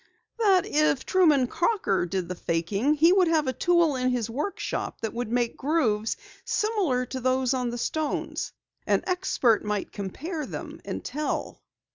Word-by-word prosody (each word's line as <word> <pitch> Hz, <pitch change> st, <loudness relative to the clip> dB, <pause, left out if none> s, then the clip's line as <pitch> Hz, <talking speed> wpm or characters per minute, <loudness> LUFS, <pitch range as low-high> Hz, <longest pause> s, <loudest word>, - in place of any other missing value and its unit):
"That 390 Hz, -5 st, +4 dB
if 295 Hz, -3 st, +1 dB
Truman 310 Hz, -8 st, +4 dB
Crocker 285 Hz, -, 0 dB
did 185 Hz, -1 st, -2 dB
the 180 Hz, -, -3 dB
faking 195 Hz, -, 0 dB
he 330 Hz, +4 st, +5 dB
would 375 Hz, -2 st, +4 dB
have 320 Hz, -2 st, +2 dB
a 260 Hz, -, 0 dB
tool 340 Hz, +1 st, +3 dB
in 255 Hz, 0 st, +1 dB
his 235 Hz, -3 st, -1 dB
workshop 400 Hz, -, -3 dB
that 225 Hz, -2 st, -3 dB
would 235 Hz, -1 st, -3 dB
make 240 Hz, -1 st, 0 dB
grooves 230 Hz, -8 st, 0 dB, 0.3 s
similar 380 Hz, -, 0 dB
to 260 Hz, +1 st, -5 dB
those 255 Hz, 0 st, +1 dB
on 250 Hz, -2 st, -1 dB
the 240 Hz, -, -4 dB
stones. 310 Hz, +5 st, -2 dB, 0.4 s
An -, -, +2 dB
expert 360 Hz, -, +2 dB
might 210 Hz, -1 st, -2 dB
compare 290 Hz, -, -5 dB
them -, -, -7 dB
and -, -, -5 dB
tell." 300 Hz, +1 st, -3 dB
260 Hz, 160 wpm, -26 LUFS, 230-335 Hz, 0.4 s, he